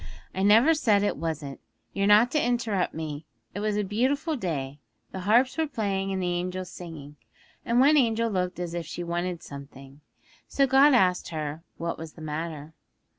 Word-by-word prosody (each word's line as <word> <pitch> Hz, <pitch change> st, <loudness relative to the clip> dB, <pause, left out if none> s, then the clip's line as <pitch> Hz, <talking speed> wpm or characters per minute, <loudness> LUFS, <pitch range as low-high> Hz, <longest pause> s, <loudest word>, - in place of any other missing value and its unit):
'I 190 Hz, -, -3 dB
never 225 Hz, +10 st, +6 dB
said 215 Hz, -10 st, +2 dB
it 205 Hz, -, 0 dB
wasn't. 155 Hz, -4 st, -4 dB, 0.3 s
You're 200 Hz, 0 st, 0 dB
not 215 Hz, +4 st, +6 dB
to 300 Hz, -, +1 dB
interrupt 235 Hz, -6 st, 0 dB
me. 155 Hz, -1 st, -6 dB, 0.3 s
It 205 Hz, -, -4 dB
was 210 Hz, 0 st, -1 dB
a 210 Hz, -, +1 dB
beautiful 265 Hz, -, 0 dB
day, 145 Hz, -, -4 dB, 0.3 s
the 190 Hz, -, -6 dB
harps 250 Hz, +7 st, +3 dB
were 320 Hz, -, +1 dB
playing 200 Hz, -7 st, -2 dB
and 190 Hz, -, -2 dB
the 180 Hz, -1 st, -1 dB
angels 180 Hz, +1 st, -4 dB
singing, 150 Hz, -4 st, -10 dB, 0.5 s
and 235 Hz, +1 st, +1 dB
one 285 Hz, +4 st, +6 dB
angel 230 Hz, -3 st, +2 dB
looked 180 Hz, -2 st, -2 dB
as 175 Hz, -1 st, -4 dB
if 170 Hz, -3 st, -4 dB
she 175 Hz, +1 st, -5 dB
wanted 175 Hz, 0 st, -3 dB
something. 140 Hz, 0 st, -11 dB, 0.5 s
So 275 Hz, -, +2 dB
God 270 Hz, +1 st, +6 dB
asked 180 Hz, -6 st, +2 dB
her 155 Hz, -1 st, -4 dB, 0.2 s
what 170 Hz, 0 st, -4 dB
was 160 Hz, -1 st, -8 dB
the 160 Hz, -, -13 dB
matter. 155 Hz, 0 st, -5 dB
185 Hz, 180 wpm, -26 LUFS, 160-230 Hz, 0.5 s, never